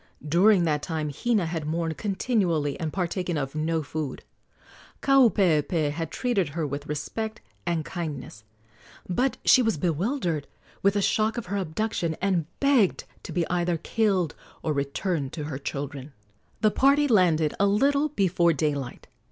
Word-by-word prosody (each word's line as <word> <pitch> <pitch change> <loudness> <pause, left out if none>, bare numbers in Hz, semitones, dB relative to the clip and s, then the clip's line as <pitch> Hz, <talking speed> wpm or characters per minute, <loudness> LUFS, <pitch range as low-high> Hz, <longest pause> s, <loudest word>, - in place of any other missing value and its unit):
During 180 +4 +5
that 150 -3 +1
time 155 -2 -3
Hina 220 - +1
had 160 -2 -3
mourned 165 0 -1
continually 190 - 0
and 160 -2 -2
partaken 180 -1 -2
of 135 -1 -3
no 160 +1 -1
food. 150 -1 -5 0.8
Kaupeepee 180 - +3
had 165 +1 -4
treated 205 - 0
her 160 +2 -2
with 140 0 -5
respect 220 +9 -4 0.3
and 165 -3 0
kindness; 145 -10 -6 0.6
but 250 +9 0
she 260 - +7
was 225 -7 +1
bewildered 170 - -1 0.3
with 200 +1 +3
the 205 - +1
shock 220 +4 +1
of 235 - -3
her 200 +2 -3
abduction, 175 -2 -2
and 180 -5 0
begged 275 -9 +3 0.2
to - - -8
be 170 0 0
either 175 -1 0
killed 190 -3 0 0.3
or 155 - 0
returned 140 +1 -2
to 155 - -4
her 145 -2 -5
children. 140 0 -5 0.5
The 215 - +4
party 280 +4 +4
landed 170 - +3
a 200 - +4
little 280 +9 +2
before 185 - +2
daylight. 145 -4 -2
170 Hz, 150 wpm, -26 LUFS, 150-205 Hz, 0.8 s, she